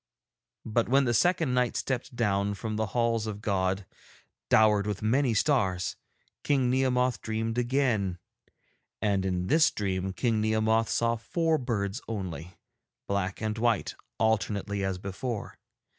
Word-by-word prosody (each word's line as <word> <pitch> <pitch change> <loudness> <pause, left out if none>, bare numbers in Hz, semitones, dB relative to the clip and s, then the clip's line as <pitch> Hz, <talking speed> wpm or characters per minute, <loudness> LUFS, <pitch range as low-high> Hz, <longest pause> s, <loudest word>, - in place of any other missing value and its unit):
But 115 +1 0
when 135 +2 +4
the 120 - +1
second 165 +1 +2
night 125 -1 +1
stepped 130 -1 -3
down 100 -3 0
from 110 +1 -4
the 110 0 -1
halls 115 -2 +1
of 105 -1 -5
God, 95 -2 -1 0.6
dowered 105 -2 +4
with 105 0 -3
many 125 +2 +2
stars, 95 - +1 0.5
King 135 -4 +2
Nehemoth 125 -2 +1
dreamed 115 +1 -2
again; 120 -8 +1 0.8
and 100 -3 +1
in 90 -1 -1
this 155 - +4
dream 95 -2 -2
King 115 0 0
Nehemoth 110 +1 +2
saw 115 0 +1
four 160 +7 0
birds 110 -2 -2
only, 90 -6 -5 0.5
black 100 -1 -2
and 110 0 -2
white 115 -2 +1 0.2
alternately 100 -2 0
as 95 -1 -1
before. 100 +4 -5
110 Hz, 135 wpm, -28 LUFS, 100-120 Hz, 0.8 s, when